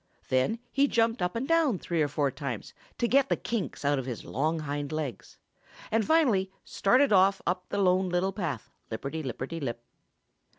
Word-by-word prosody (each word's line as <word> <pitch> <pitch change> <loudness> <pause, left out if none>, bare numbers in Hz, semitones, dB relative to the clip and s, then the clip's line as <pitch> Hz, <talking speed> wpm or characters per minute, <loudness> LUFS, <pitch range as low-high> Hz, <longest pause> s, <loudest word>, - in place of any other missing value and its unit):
Then 130 - +2
he 280 +1 +3
jumped 230 -3 +1
up 180 +3 0
and 245 +4 -2
down 325 - +3
three 170 -2 -1
or 150 - +3
four 145 -1 0
times 135 -5 -5 0.2
to 240 - +1
get 275 +2 +3
the - - +3
kinks 220 -10 -3
out 145 -1 +3
of 130 - -5
his 120 -3 -5
long 155 +4 0
hind 145 0 -3
legs, 155 -6 -5 0.5
and 225 0 +3
finally 235 -11 +3
started 255 +4 +3
off 195 +1 +5
up 180 +1 -2
the - - -2
Lone 185 -1 +3
Little 180 +2 0
Path, 170 - -4 0.2
lipperty 140 +8 -4
lipperty 135 +5 -4
lip. 120 -3 -4
180 Hz, 180 wpm, -29 LUFS, 145-225 Hz, 0.5 s, off